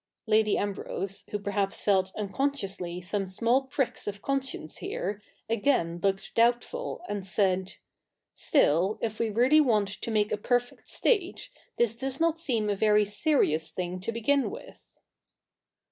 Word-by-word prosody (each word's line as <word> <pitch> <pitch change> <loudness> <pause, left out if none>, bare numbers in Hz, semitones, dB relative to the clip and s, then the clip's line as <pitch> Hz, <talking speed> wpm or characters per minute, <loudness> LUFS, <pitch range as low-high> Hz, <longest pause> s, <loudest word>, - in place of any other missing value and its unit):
Lady 215 -1 +3
Ambrose, 195 -1 -3
who 210 - -2
perhaps 200 -1 -2
felt 190 -2 +2
unconsciously 200 -6 -2
some 195 +2 -3
small 230 +7 +2
pricks 265 -3 -2
of 200 -1 -4
conscience 265 - -3
here, 205 +2 -4 0.3
again 205 -7 +1
looked 195 0 -1
doubtful 240 - +1
and 205 -2 -3
said, 190 0 +1 0.3
' - - -58 0.3
Still 190 - +2
if 220 -2 -3
we 230 - +1
really 250 +8 +5
want 215 -8 +2
to 205 - -5
make 210 -2 +1
a - - +1
perfect 245 +3 -1
state, 410 +2 0 0.3
this 235 -2 +2
does 265 +2 -4
not 330 0 +2
seem 235 -10 0
a 205 - +1
very 210 +1 +4
serious 205 - +1
thing 180 +2 -4
to 190 +5 -3
begin 255 +5 +1
with.' - - -12
210 Hz, 145 wpm, -28 LUFS, 195-255 Hz, 0.3 s, really